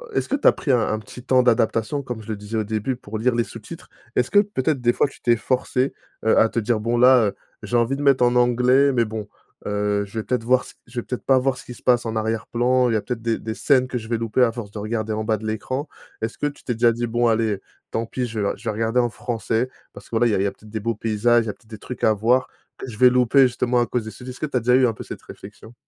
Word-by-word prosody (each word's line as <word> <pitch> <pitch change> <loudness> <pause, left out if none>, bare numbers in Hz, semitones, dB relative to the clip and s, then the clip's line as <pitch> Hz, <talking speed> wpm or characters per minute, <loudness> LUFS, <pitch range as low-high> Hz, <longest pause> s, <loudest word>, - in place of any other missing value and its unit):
est-ce - - 0
que 280 - +1
tu 285 - +2
as - - +9
pris 140 - -2
un 125 - +4
un 110 - 0
petit 110 +4 -12
temps 130 -1 +3
d'adaptation, 115 +3 +1
comme 120 -5 -6
je - - -13
le 110 - -1
disais 105 +2 -5
au 110 - +1
début, 110 +4 -2
pour 110 -2 -7
lire 120 +1 +1
les 120 - +2
sous-titres? 115 +11 -11 0.3
Est-ce 125 - +1
que 205 - +6
peut-être 155 -9 0
des 120 0 +3
fois - - +2
tu - - -16
t'es 120 -1 +3
forcée, 130 +2 -1 0.3
heu, 110 - +4
à 110 - +4
te - - -8
dire: 110 +1 0
«Bon, 115 +2 -1
là, 125 +1 +7
heu, 100 - -4 0.3
j'ai 120 - -1
envie 120 +4 +1
de - - -5
mettre 135 -3 +4
en 120 0 +3
anglais, 125 +3 +4
mais 120 -2 +2
bon, 110 -1 -6 0.4
heu, 105 0 0
je 100 +3 -10
vais - - -3
peut-être 125 -3 -1
voir 125 +1 +3
ce - - -12
je 120 +1 -5
vais - - -17
peut-être 125 - -5
pas 135 -1 +4
voir 130 0 +1
ce - - -11
qui 125 - -8
se - - -17
passe 120 -2 +3
en 115 - -3
arrière-plan. 120 +3 +1
Il 115 - 0
y - - +2
a 110 - +1
peut-être 120 -1 -5
des 115 -1 0
des 110 - -4
scènes 130 +1 +2
que 130 - -3
je 110 -1 -7
vais 115 -1 0
louper 115 +2 0
à 115 - +3
force 110 -4 -7
de 105 - -7
regarder 110 +1 -3
en 110 0 -2
bas 110 0 +2
de 110 - -9
l'écran»? 130 +7 -3 0.3
Est-ce 110 +1 -3
que - - -2
tu 145 - -9
t'es 120 - -2
déjà 115 +1 +3
dit: 120 +1 -2
«Bon, 120 +1 +1
allez, 110 -3 +1 0.3
tant 115 +1 -1
pis, 125 +2 -3
je 115 -2 -5
vais 100 - +1
re - - -8
je 105 - -17
vais - - +1
regarder 115 +3 0
en 120 - 0
français, 115 +1 -2 0.2
parce - - -12
que - - -21
voilà 120 +2 +3
il 115 - +1
y - - +2
a - - 0
il 95 - +1
y - - +2
a - - -2
peut-être 110 - -17
des 110 - -3
beaux 115 +1 -2
paysages, 115 +2 +2
il - - -7
y - - -2
a - - -3
peut-être 115 - -28
des 110 - -8
trucs 125 +4 -9
à 110 - +5
voir, 120 +5 +2 0.3
que - - -7
je 105 - -9
vais 125 +1 +7
louper 125 +2 +4
justement 120 0 0
à - - +2
cause 115 -1 -2
des 110 - -6
sous-titres». 125 0 -10
Est-ce 125 - -12
que - - -1
tu 145 - -7
as - - 0
déjà 125 +2 +3
eu 130 -1 +5
un 115 - -1
peu - - -9
cette - - -9
réflexion? 105 +3 -12
120 Hz, 320 wpm, -22 LUFS, 110-125 Hz, 0.4 s, as